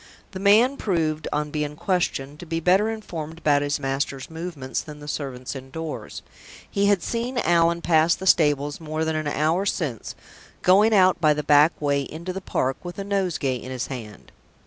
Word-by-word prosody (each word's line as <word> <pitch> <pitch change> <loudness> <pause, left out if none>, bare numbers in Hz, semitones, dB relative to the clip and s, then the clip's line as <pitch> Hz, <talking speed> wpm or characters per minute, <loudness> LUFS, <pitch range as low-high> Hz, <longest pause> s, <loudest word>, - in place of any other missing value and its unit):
The 185 - -6
man 220 +8 +4
proved, 160 -5 -1
on 150 0 -2
being 150 -1 -3
questioned, 155 -5 -1
to 175 - -9
be 165 +1 -1
better 190 +6 +3
informed 165 -8 -6
about 145 -3 +2
his 145 0 -1
master's 135 +1 -3
movements 160 -5 -4
than 150 -1 -10
the 145 - -10
servants 135 -3 -5
indoors. 140 +4 -7 0.4
He 200 -1 +1
had 200 -4 +2
seen 240 +2 -3
Allan 170 -4 +2
pass 165 0 +4
the 190 - -8
stables 145 -5 +3
more 155 0 -2
than 160 0 -1
an 155 -1 -2
hour 155 +5 +1
since, 150 - -3 0.5
going 200 +5 +5
out 185 -4 +4
by 155 -2 +4
the 150 - -3
back 150 +3 +4
way 140 -1 +1
into 165 +6 -6
the 195 - -5
park 135 -7 -1
with 175 0 -7
a 200 - -3
nosegay 185 -10 -1
in 125 - -9
his 125 -1 -3
hand. 110 -5 -10
160 Hz, 185 wpm, -24 LUFS, 145-185 Hz, 0.5 s, going